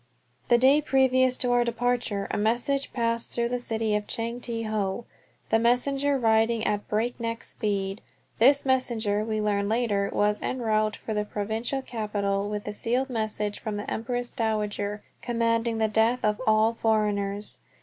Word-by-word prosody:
The 240 - +5
day 270 +5 +5
previous 260 -2 +3
to 250 -2 0
our 245 0 +4
departure 235 -3 -1
a - - -1
message 240 +6 0
passed 230 -1 -1
through 235 0 -1
the 245 0 -1
city 225 -3 -1
of 210 0 -2
Chang 235 +1 -3
Te 230 -1 -3
Ho, 215 0 -2 0.4
the 225 - +3
messenger 275 +4 +2
riding 225 -1 +2
at 205 0 -1
breakneck 230 +1 -2
speed. 195 -1 -2 0.4
This 275 +5 +5
messenger, 230 -6 +1
we 215 -1 -2
learned 205 -1 0
later, 215 -4 +1
was 210 0 +1
en 255 - -2
route 215 -1 +1
for 220 - -5
the 210 0 0
Provincial 220 +6 -3
Capital 205 -3 -2
with 210 0 -3
the 210 - -5
sealed 250 +5 -1
message 215 -2 -2
from 215 -1 -4
the 205 - -5
Empress 245 +2 -3
Dowager 210 -3 -2 0.2
commanding 230 -1 0
the 220 0 +2
death 225 +3 +2
of 210 +2 0
all 215 +1 +4
foreigners. 210 -2 0
225 Hz, 160 wpm, -26 LUFS, 210-245 Hz, 0.4 s, The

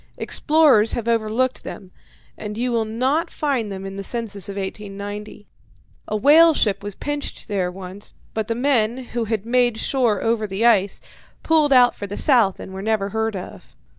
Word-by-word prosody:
Explorers 295 -9 +4
have 235 -1 -3
overlooked 230 +3 0
them, 185 -2 -9 0.4
and 210 0 -7
you 245 +1 -1
will 230 -2 0
not 260 +9 0
find 260 -8 -2
them 195 0 -6
in 195 0 -7
the 195 - -5
census 205 -3 -3
of 200 - -6
1890. 205 +1 -7 0.6
A 215 - -1
whale 310 +7 +6
ship 200 -3 +1
was 205 -1 -7
pinched 290 0 -5
there 195 -5 -1
once, 190 +2 -10 0.2
but 220 -1 -2
the 230 - -1
men, 240 -3 +1 0.2
who 240 -1 -1
had 215 -2 -2
made 240 -1 +2
shore 235 -5 0
over 225 -1 0
the 200 +4 -1
ice, 205 -5 +3 0.4
pulled 310 -3 +3
out 250 -2 +6
for 200 - -7
the 205 - -6
south 235 - +3
and 190 - -9
were 190 - -6
never 210 -1 0
heard 220 +1 -2
of. 180 - -9
220 Hz, 180 wpm, -21 LUFS, 200-245 Hz, 0.6 s, whale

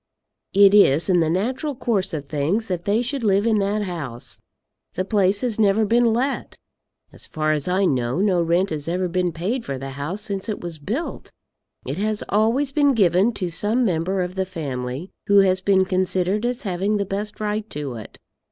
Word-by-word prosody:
It 200 0 +7
is 165 -6 +5
in 180 -2 +4
the 160 -2 +2
natural 255 - -1
course 225 -6 -1
of 150 -4 -4
things 160 +11 -1
that 175 -2 -3
they 215 +4 +2
should 265 +1 -2
live 200 0 +2
in 220 -2 +3
that 205 +1 0
house. 150 - -6 0.6
The 185 - -1
place 200 -1 +1
has 240 -4 -2
never 210 +1 +3
been 235 +2 +3
let. 260 +5 -2 0.6
As - - -8
far 155 0 -1
as 150 0 -1
I 185 +2 +2
know, 125 -2 0
no 190 -3 +2
rent 170 +3 +1
has 150 -1 -4
ever 180 +2 0
been 180 0 0
paid 195 +10 -3
for 135 - -4
the 135 +1 -6
house 145 +9 -5
since 200 -1 -5
it 210 - -3
was 170 -3 -7
built. 230 - -4 0.5
It 140 +7 -4
has 215 0 -1
always 230 +7 +2
been 285 -2 +3
given 190 +1 +3
to 185 -4 -3
some 215 +8 +1
member 185 0 0
of 180 0 -5
the 190 0 -1
family, 140 -3 -5 0.2
who 200 0 +6
has 190 -1 +2
been 190 -1 +3
considered 185 +3 0
as 245 0 -3
having 195 +2 0
the 200 - -1
best 205 +2 -5
right 215 +1 -2
to 145 -3 -5
it. 110 - -11
190 Hz, 200 wpm, -22 LUFS, 170-215 Hz, 0.6 s, It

